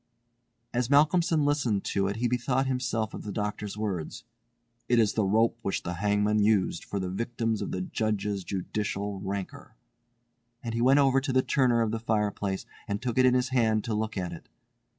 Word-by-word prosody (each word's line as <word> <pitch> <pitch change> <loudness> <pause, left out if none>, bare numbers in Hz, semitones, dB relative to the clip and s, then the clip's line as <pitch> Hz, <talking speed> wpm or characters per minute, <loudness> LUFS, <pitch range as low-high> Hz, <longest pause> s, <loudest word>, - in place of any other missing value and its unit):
As 120 0 0
Malcolmson 155 +2 +4
listened 135 -9 +1
to 100 -1 0
it 100 - -2
he 120 +2 0
bethought 125 +2 0
himself 120 -4 -1
of - - -6
the 105 - -6
doctor's 105 0 -4
words, 95 -7 -4 0.7
"It 120 - +4
is 110 -3 +3
the 110 - +1
rope 110 +4 +2
which 95 - -2
the 90 - -3
hangman 105 +1 +2
used 105 -2 +2
for 100 - -4
the 95 - -2
victims 115 +1 -2
of - - -3
the 90 - -2
Judge's 105 0 -2
judicial 100 +1 -3
rancour," 95 -1 -6 0.9
and 115 -2 -4
he 115 - -1
went 130 +3 +5
over 135 -1 +4
to 135 0 -2
the 130 0 +3
corner 120 -4 +3
of 110 - -1
the 115 - -2
fireplace 105 -3 -1 0.2
and 100 0 -2
took 125 -1 -1
it 130 - +6
in 125 - +4
his 125 0 +1
hand 110 -4 +2
to 115 - -3
look 110 0 -2
at 90 -2 -3
it. 85 - -11
110 Hz, 190 wpm, -28 LUFS, 100-125 Hz, 0.9 s, it